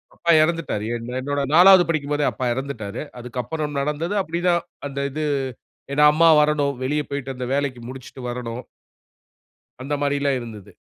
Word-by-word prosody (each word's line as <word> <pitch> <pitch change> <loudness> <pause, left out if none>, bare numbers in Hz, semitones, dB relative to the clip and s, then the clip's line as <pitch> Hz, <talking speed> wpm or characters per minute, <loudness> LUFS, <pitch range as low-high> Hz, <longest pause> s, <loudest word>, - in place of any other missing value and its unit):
அப்பா 170 - +1
எறந்துட்டாரு. 160 -10 -1
என் 115 +1 -6
என்னோட 145 +1 -2
4வது 185 +2 +8
படிக்கும் 150 -3 -1
போதே 145 0 +1
அப்பா 130 - -4
எறந்துட்டாரு. 120 -5 -5 0.2
அதுக்கப்புறம் 125 +5 -4
நடந்தது 150 +7 -2
அப்படிதான் 175 -1 0 0.3
அந்த 140 0 -6
இது. 155 +2 -3 0.7
ஏன்னா, 150 +1 +4
அம்மா 165 +2 +5
வரணும். 150 -2 +1
வெளிய 150 +3 0
போய்ட்டு 140 -1 -4
அந்த 125 0 -4
வேலைக்கு 135 -4 -1
முடிச்சுட்டு 130 0 -10
வரணும். 120 0 -5 1.2
அந்த 145 +2 -3
மாரில்லாம் 140 -1 +1
இருந்தது. 110 -5 -10
140 Hz, 145 wpm, -22 LUFS, 125-155 Hz, 1.2 s, 4வது